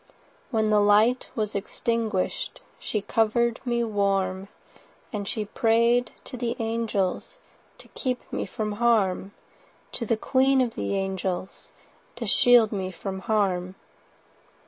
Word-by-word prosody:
When 220 -3 +1
the 210 - +5
light 210 +5 +4
was 215 -2 -2
extinguish'd, 215 0 -2 0.2
She 210 - -2
cover'd 230 +2 +1
me 240 -1 +1
warm, 195 -3 0 0.6
80 - - -31
And 205 -2 -3
she 215 -1 -2
pray'd 235 +2 +2
to 255 - -7
the 235 -1 -2
angels 225 - -2 0.4
To - - -15
keep 255 -2 -4
me - - -2
from 215 -3 -3
harm— 205 -4 +1 0.6
To - - -3
the 225 - +2
queen 265 +3 +3
of 245 -3 +1
the 200 - -2
angels 190 -1 -3 0.5
To - - -5
shield 240 -3 +5
me 190 -3 -2
from 190 +1 -6
harm. 190 -3 0
215 Hz, 130 wpm, -26 LUFS, 195-235 Hz, 0.6 s, the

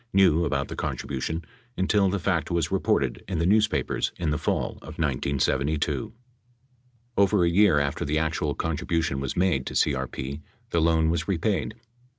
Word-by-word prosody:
knew 90 -4 +4
about 70 -2 -1
the - - -6
contribution 75 +5 -3 0.3
until 95 +1 +3
the 100 - 0
fact 90 -3 0
was 85 -3 0
reported - - 0
in 95 -2 -2
the 85 - +1
newspapers 100 -8 +2
in 80 -3 -1
the 75 - 0
fall - - -1
of - - -10
1972. 70 - 0 1.1
553 100 - +6
Over 95 -2 +3
a - - +3
year 90 -3 +4
after 70 -1 -1
the 75 +2 0
actual 80 -1 -1
contribution 80 -2 -1
was 70 -1 -4
made 85 -8 +1
to - - -5
CRP, 65 +1 -1 0.3
the 85 - +2
loan 80 0 +3
was 85 -1 -2
repaid. 100 +1 -1
80 Hz, 160 wpm, -26 LUFS, 70-95 Hz, 1.1 s, 553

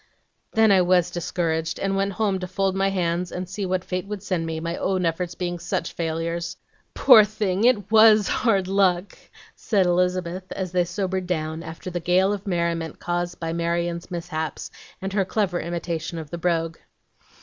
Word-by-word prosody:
"Then 220 -1 +5
I 190 -2 +6
WAS 180 -1 +3
discouraged, 165 -2 -2
and 195 0 0
went 195 0 0
home 200 -2 0
to 185 - -4
fold 190 +1 0
my 195 0 +2
hands, 175 -2 -1
and 180 0 -4
see 190 +1 -4
what 185 0 -1
fate 185 +1 -4
would 205 -1 -5
send 180 -5 -1
me, 160 0 -3
my 170 +1 -3
own 185 -2 0
efforts 170 +1 -2
being 175 -1 -3
such 165 - -3
failures." 170 +1 -3 0.4
"Poor 245 -6 +8
thing, 205 -1 -1
it 210 -5 +2
WAS 215 -2 +7
hard 195 -6 +1
luck!" 190 -1 +1 0.4
said 200 -5 +1
Elizabeth, 180 +1 0
as 185 -2 -4
they 180 -1 +2
sobered 190 0 -2
down 160 -2 -2
after 165 +2 -7
the 175 - -2
gale 185 +4 +2
of 205 0 -6
merriment 170 -3 -1
caused 175 0 -3
by 165 -1 -3
Marion's 170 0 -2
mishaps, 160 -4 -4 0.3
and 195 0 -3
her 200 -1 +2
clever 190 -2 -1
imitation 170 -1 -4
of 155 -3 -7
the 170 - -4
brogue. 165 -1 0
180 Hz, 180 wpm, -24 LUFS, 170-195 Hz, 0.4 s, Poor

